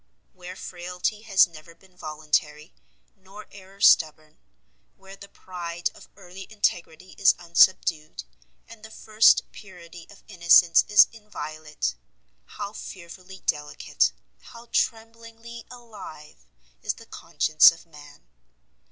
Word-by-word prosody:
Where 180 0 -11
frailty 180 +4 -5
has 195 -1 +6
never 165 -1 -15
been 185 +1 -25
voluntary, 150 -2 -3 0.4
nor 195 +3 -14
error 195 0 -16
stubborn, 155 -5 +3 0.6
where 195 0 -14
the 200 0 -14
pride 175 -2 -6
of - - -17
early 185 +2 -12
integrity 185 -4 -3
is 195 -2 +5
unsubdued, 170 - +1 0.4
and 230 -1 -15
the 220 - -11
first 220 0 +3
purity 175 -4 -14
of 200 - -18
innocence 170 -1 +5
is 210 - +7
inviolate, 155 -9 -6 0.5
how 200 - -8
fearfully 185 -1 -11
delicate, 150 0 -1 0.3
how 235 0 -15
"tremblingly 230 +1 -4
alive," 205 - -13 0.3
is - - -3
the - - -15
conscience 155 0 +3
of 165 0 -14
man! 145 - -17
180 Hz, 115 wpm, -24 LUFS, 160-205 Hz, 0.6 s, is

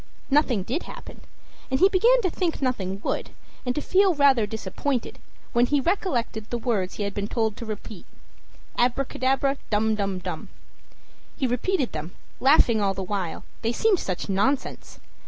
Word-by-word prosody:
Nothing 265 -8 +3
did 260 - -2
happen, - - -10 0.5
and 265 0 +1
he 380 - +7
began 460 +6 +4
to 370 - +1
think 345 -2 -1
nothing 200 -8 -2
would, - - -2 0.4
and 250 - +1
to 300 - -1
feel 385 -2 +4
rather 270 -7 +4
disappointed, 225 +5 -3 0.3
when 240 0 +4
he 290 +1 +2
recollected 255 - -1
the 240 - -1
words 215 -6 -1
he 210 - -3
had 200 0 -3
been 205 0 -2
told 220 -2 0
to 230 - -7
repeat 215 -2 -7 0.7
"Abracadabra, 270 +2 +1
dum 220 +1 +2
dum 200 -3 -1
dum!" 185 - -6 0.9
He 270 - 0
repeated 255 +4 0
them, 155 +3 -6 0.2
laughing 250 -5 +5
all 195 -1 +1
the 195 - -3
while, 185 -3 -3 0.2
they 230 - 0
seemed 390 - +2
such 185 -2 -3
nonsense. 210 +8 -1
240 Hz, 160 wpm, -25 LUFS, 205-285 Hz, 0.9 s, he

